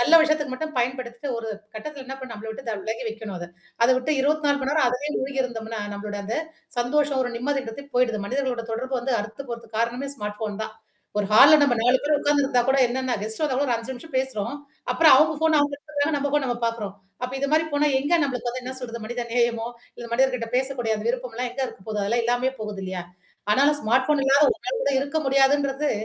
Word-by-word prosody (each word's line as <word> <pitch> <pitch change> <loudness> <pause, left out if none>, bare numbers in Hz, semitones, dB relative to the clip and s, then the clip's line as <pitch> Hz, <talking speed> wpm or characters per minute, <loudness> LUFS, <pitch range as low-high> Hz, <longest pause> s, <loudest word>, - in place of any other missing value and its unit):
நல்ல 330 +7 +7
விஷத்துக்கு 305 -3 +1
மட்டும் 310 +4 -4
பயன்படுத்திட்டு 245 +1 -2
ஒரு 225 -1 -5 0.3
கட்டத்துல 275 +5 -7
என்ன 265 - -5
பண்ண, 260 -2 -8
நம்மள 220 +1 -8
விட்டு 240 +4 -8
த - - 0
விலகி 220 +2 -4
வைக்கணும் 220 -3 -6
அத. 175 - -6 0.4
அத - - +4
விட்டு 255 +4 0
24 290 0 +2
மணி 265 0 -1
நேரம் 310 -4 +3
அதிலேயே 265 +5 -2
மூழ்கி 270 0 -2
இருந்தோம்னா, 225 -3 -5
நம்மளோட 205 0 -5
அந்த 220 +3 -2 0.4
சந்தோஷம், 280 +3 +1
ஒரு 245 - -2
நிம்மதின்றது 265 0 -3
போயிடுது. 235 -4 +2
மனிதர்களோட 255 -1 -1
தொடர்பு 255 +4 -3
வந்து 250 +1 0
அறுத்து 215 +6 -7
போறத்துக்கு 230 -2 -6
காரணமே 240 +4 -1
ஸ்மார்ட் 210 -3 -5
ஃபோன் 215 -1 -3
தான். 220 - -8 0.4
ஒரு 205 - +1
ஹால்ல 275 +8 +9
நம்ம 280 -4 +4
4 250 +2 +5
பேரும் 295 0 +2
உட்கார்ந்துருந்தா 285 -3 +3
கூட 265 - +4
என்னென்னா, 260 +1 -1
கெஸ்ட் 220 +1 -5
வந்த 295 -4 +1
கூட 285 +2 +1
ஒரு 245 - +2
5 230 +3 -7
நிமிஷம் 265 +4 -11
பேசுறோம். 260 -3 -2 0.4
அப்புறம் 325 -1 +6
அவவுங்க 310 +4 +5
ஃபோன் 320 -1 +4
அவங்க 290 0 +2
எடுத்துக்குக்கறாங்க. 290 +1 -1
நம்ம 285 0 -1
ஃபோன் 295 -1 +2
நம்ம 245 -1 -1
பார்க்குறோம். 220 -4 -3 0.3
அப்ப 250 +1 -3
இது 280 - 0
மாரி 315 +1 +4
போனா 290 +1 +3
எங்க 285 +5 -2
நம்மளுக்கு 250 -4 -1
வந்து 255 +1 -5
என்ன 255 +1 -5
சொல்றது 235 -2 -6
மனித 240 +2 -3
நேயமோ 235 -1 +1 0.3
இல்ல, 240 - -7
மனதர்கிட்ட 250 -1 +2
பேசக்கூடிய 250 -3 0
அந்த 210 - -6
விருப்பம்லாம் 245 0 -2
எங்க 255 +3 -6
இருக்க - - -11
போகுது? 210 -1 -1
அதெல்லாம் 235 +4 +1
இல்லாமயே 245 +2 +1
போகுது 210 -2 -5
இல்லையா? 185 -1 -4 0.5
ஆனாலும் 280 +7 +4
ஸ்மார்ட் 255 +3 +2
ஃபோன் 300 -2 +3
இல்லாத 275 +2 +5
ஒருநாள் 480 +2 -2
கூட - - +1
இருக்க 280 +3 -3
முடியாதுன்றது 275 +1 +3
255 Hz, 210 wpm, -24 LUFS, 230-285 Hz, 0.5 s, ஹால்ல